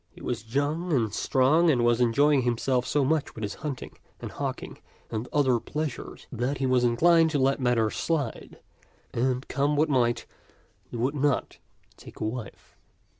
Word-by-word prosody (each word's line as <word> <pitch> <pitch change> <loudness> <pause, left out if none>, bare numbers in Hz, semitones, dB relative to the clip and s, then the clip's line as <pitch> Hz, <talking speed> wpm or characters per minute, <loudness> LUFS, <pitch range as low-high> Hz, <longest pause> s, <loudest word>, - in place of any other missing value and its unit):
He - - -17
was 115 0 -5
young 155 +5 0
and 115 -8 +1
strong 150 +9 +3
and 120 -6 +3
was 120 0 +3
enjoying 140 +4 +4
himself 125 +1 0
so 145 -2 +1
much 155 +1 0
with 110 - -7
his 100 - -3
hunting 145 -4 -6 0.2
and - - -7
hawk - - -4
ing - - -10 0.3
and 115 +2 -4
other 130 -5 +2
pleasures 150 +2 -5
that 125 +3 -2
he 135 - -1
was 130 -1 +2
inclined 165 +7 +4
to 150 - 0
let 135 +1 +2
matters 120 -3 +1
slide, 160 -4 -3 0.6
and 125 +2 -1
come 145 +1 0
what 150 +2 +2
might, 120 -4 +1 0.6
he - - -6
would 125 +5 0
not 145 -2 -1 0.4
take - - -13
a - - -3
wife. 110 +1 -6
130 Hz, 175 wpm, -27 LUFS, 120-145 Hz, 0.6 s, enjoying